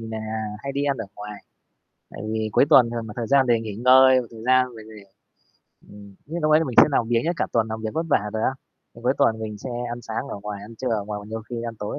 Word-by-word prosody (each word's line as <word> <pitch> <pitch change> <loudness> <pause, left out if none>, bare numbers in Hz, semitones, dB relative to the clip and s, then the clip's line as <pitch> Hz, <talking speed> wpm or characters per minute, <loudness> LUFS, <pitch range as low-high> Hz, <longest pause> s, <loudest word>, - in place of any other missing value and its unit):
thì 115 - -7
nà 110 0 -5 0.4
hay 140 - -4
đi 140 +1 -1
ăn 140 -2 0
ở 115 - -4
ngoài, 105 0 -9 0.7
tại - - -10
vì 110 -1 -1
cuối - - +4
tuần 120 -3 +7
thường 115 -1 -4
nà 105 - -8
thời 115 - -3
gian 140 0 +4
để 120 -2 +3
nghỉ 110 -3 -6
ngơi, 130 +2 +6
và 120 - -10
thời 110 0 -11
gian 130 -1 +3
mình 110 -1 -11
để 105 - -12 0.9
ừm, 100 -1 -13
những 170 +3 -4
núc 155 - +2
ấy 155 +1 +5
mình 125 - -5
sẽ - - +10
làm 120 -4 +1
biếng 120 -1 +1
nhất, 170 +2 0
cả - - 0
tuần 115 -1 +1
làm 110 0 -5
việc 110 - -2
vất 165 +1 -1
vả 105 -4 +1
rồi 110 0 -2
á, - - +2 0.4
ừm, - - -14
cuối - - +3
tuần 110 - +3
mình 110 -1 -6
sẽ 125 +4 -7 0.2
ăn 120 - -5
sáng 115 +5 -4
ở - - -5
ngoài, 105 -1 -6
ăn 115 +2 -11
trưa 130 - -3
ở 110 -4 -1
ngoài, 105 0 -5
và 100 - -11
nhiều 110 0 -5
khi 120 - -4
ăn 115 -1 -5
tối 105 +7 -4
115 Hz, 290 wpm, -23 LUFS, 110-130 Hz, 0.9 s, sẽ